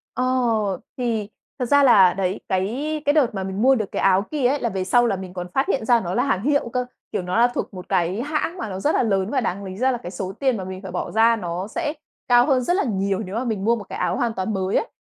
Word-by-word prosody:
Ờ, 255 - 0 0.7
thì 225 -5 -1 0.3
thật 250 - 0
ra 285 +4 +4
là, 195 -9 +6
đấy, 190 0 -2
cái 250 +12 -1
cái 290 - +4
đợt 275 -8 +2
mà 190 - -2
mình 190 +2 -4
mua 265 +3 +5
được 215 -5 -3
cái - - -2
áo 190 0 +4
kia 290 -5 +1
ấy 285 +3 +1
là 235 - -1
về 190 -2 -2
sau 240 +6 +3
là 205 - 0
mình 185 -1 -8
còn 180 -1 -5
phát 270 - +1
hiện 270 - 0
ra 240 0 +4
nó 180 -4 -4
là 245 - +2
hàng 235 -8 0
hiệu 285 -3 +1
cơ, 250 +1 -1 0.3
kiểu, - - -1
nó 180 +3 -2
là 235 +1 +6
thuộc 245 - -4
một 180 -1 -9
cái 180 +5 0
hãng 305 +5 -2
mà 220 - -4
nó 190 -1 -5
rất 295 +10 +1
là - - +3
lớn, 195 -3 0
và 260 +1 0
đáng 200 -2 -3
lý 190 -1 -7
ra 260 +4 +2
là 245 - -1
cái 180 -7 -8
số 185 0 -4
tiền 265 -4 +1
mà 190 - -5
mình 190 0 -7
phải 190 -2 -8
bỏ 180 - -3
ra 225 +2 +4
nó 180 -2 -4
sẽ 300 +5 -3 0.3
cao 245 -1 +5
hơn 265 -3 +3
rất 350 - +1
là 400 - +1
nhiều 195 -4 -1
nếu 195 -2 -5
mà 235 - -1
mình 215 -5 -2
mua 235 +1 +4
một 220 - -6
cái - - -6
áo - - 0
hoàn 240 -4 0
toàn 190 +1 -2
mới 190 0 -1
ấy. - - +1
220 Hz, 295 wpm, -22 LUFS, 190-255 Hz, 0.7 s, là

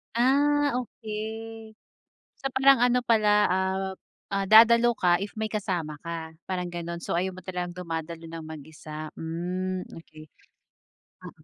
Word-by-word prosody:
Ah, 285 +2 +3
okay. 220 -1 -6 0.6
So - - -14
parang 270 +1 +6
ano 245 +1 +3
pala 220 -3 +3 0.2
ap 190 +1 -1 0.3
ah, 195 0 -1
dadalo 235 +3 +7
ka 175 -5 +3
if 200 +1 -5
may 220 0 -3
kasama 180 -8 -3
ka, 165 -1 -4 0.2
parang 180 -1 -3
gano'n. 170 0 -5
So 170 - -2
ayaw 185 +1 -1
mo 185 - -10
talagang 180 -1 -4
dumadalo 165 -2 -5
ng 165 -1 -7
mag-isa, 155 0 -8
hmm, 180 +3 -3 0.2
okay. 155 -2 -14 0.9
Mm. - - -12
185 Hz, 135 wpm, -27 LUFS, 170-225 Hz, 0.9 s, dadalo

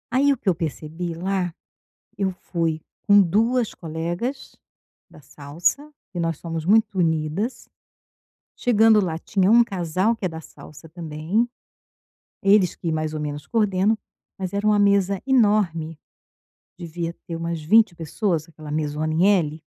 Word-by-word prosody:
Aí 280 +2 +4
o - - -5
que 215 - -1
eu - - +4
percebi, 165 +1 -4
lá, 180 0 -2 0.6
eu 195 -1 +1 0.2
fui 165 -3 0 0.3
com 205 -1 +7
duas 225 +6 +1
colegas 175 - -4 0.6
da 150 - -16
salsa, 170 - -2 0.2
que 180 - -5
nós 165 -2 -1
somos 165 -2 -5
muito 205 0 +3
unidas. 160 +7 -1 0.9
Chegando 225 -2 +4
lá, 165 -5 -1
tinha 195 +2 +1
um 235 +1 +7
casal 190 +1 0
que 215 - -5
é - - 0
da 160 0 -8
salsa 160 +1 -14
também, 165 +7 -2 1.0
eles 195 -2 +4
que 170 - -4
mais 155 -1 -2
ou 155 - -4
menos 145 0 -5
coordenam, 210 -1 +1 0.4
mas 190 0 -4
era 200 +1 -1
uma 210 -1 +4
mesa 200 -1 +2
enorme, 205 - +2 0.8
devia 170 0 -4
ter 170 - -4
umas 165 0 -3
20 210 +5 +4
pessoas, 170 0 -2
aquela 155 -2 -10
mesona 155 +1 -2
em 170 +5 +3
L. 160 -6 +1
175 Hz, 145 wpm, -23 LUFS, 160-205 Hz, 1.0 s, com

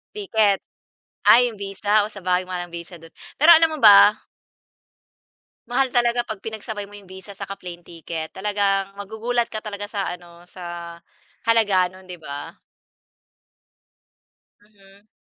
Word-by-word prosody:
Ticket. 220 - +1 0.7
Ay, 245 +1 +7
yung 220 - -11
visa, 205 +2 +1
oh, - - -7
sa 205 - -10
bagay 180 0 +1
mahal 180 -1 -4
ang - - -23
visa 170 +1 -9
dun, 165 0 -15 0.3
pero 310 +4 +8
alam 320 -1 +3
mo - - -9
ba? 205 -3 +9 1.6
Mahal 260 +1 0
talaga 240 0 +2
'pag 215 -3 -7
pinagsabay 215 -2 -6
mo 205 - -12
yung 200 - -15
visa 190 +1 -12
saka 195 - -6
plane 175 -3 -10
ticket. 165 -1 -7
Talagang 195 0 -1
magugulat 220 +4 -2
ka 215 -1 -7
talaga 205 -1 -6
sa 205 -1 -3
ano, 175 -1 -10
sa 170 -2 -8 0.5
halaga 210 -5 +3
nun, 185 0 -16
di 180 - -7
ba? 145 -3 -8 2.0
Mhm. 205 -1 -23
200 Hz, 145 wpm, -22 LUFS, 180-220 Hz, 2.0 s, ba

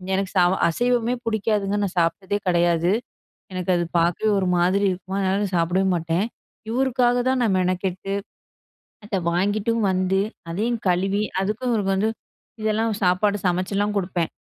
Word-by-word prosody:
எனக்கு 195 -1 -2
சாவ 180 0 +5 0.2
அசைவமே 245 +5 +1
பிடிக்காதுங்க. 210 -2 0
நான் 195 -1 -3
சாப்பிட்டதே 190 +4 0
கெடையாது. 175 0 +2 0.6
எனக்கு 185 0 -3
அத 175 - 0 0.2
பார்க்கவே 175 +6 +1
ஒரு 190 - 0
மாதிரி 185 +3 +2
இருக்குமா, 185 +1 -5
அதனால 195 +1 +1
நான் 195 -2 -4
சாப்பிடவே 175 +3 +1
மாட்டேன். 165 +3 0 0.5
இவருக்காக 245 0 +2
தான் 260 0 +1
நான் 215 -5 +2
மெனக்கெட்டு, 185 +1 -1 0.9
அத 210 -1 -2 0.2
வாங்கிட்டும் 205 +5 0
வந்து 185 +1 +1 0.3
அதையும் 225 +7 -1
கழுவி, 195 +3 +1 0.2
அதுக்கும் 215 +6 -2
இவரு 210 -3 0
வந்து, 210 +3 +1 0.5
இதெல்லாம் 220 +1 +1
சாப்பாடு 200 +3 +2
சமைச்சுலாம் 195 +3 0
குடுப்பேன். 180 -3 -2
195 Hz, 135 wpm, -23 LUFS, 180-215 Hz, 0.9 s, சாவ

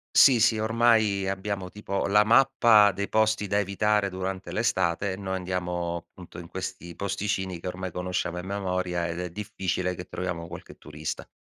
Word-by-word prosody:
Sì, 130 -4 +7
sì, 110 -1 +3
ormai 110 -3 +3
abbiamo 95 -1 -3
tipo 100 -1 -3
la 105 +1 +5
mappa 110 -2 +5
dei 100 0 -4
posti 110 -1 +2
da 100 +1 +1
evitare 100 0 +1
durante 95 +1 -4
l'estate 95 -3 0
e - - -4
noi 95 -1 -3
andiamo 90 -2 -2
appunto 90 -2 -13
in 85 -1 -9
questi 85 0 -6
posticini 95 -2 -2
che - - -13
ormai 90 0 -4
conosciamo 90 0 -2
a 90 - -5
memoria 90 -3 -2
ed 85 0 -4
è 90 0 -3
difficile 95 -2 -2
che 90 - -7
troviamo 90 -3 -4
qualche 85 +1 -10
turista. 75 0 -6
95 Hz, 170 wpm, -27 LUFS, 90-105 Hz, -, Sì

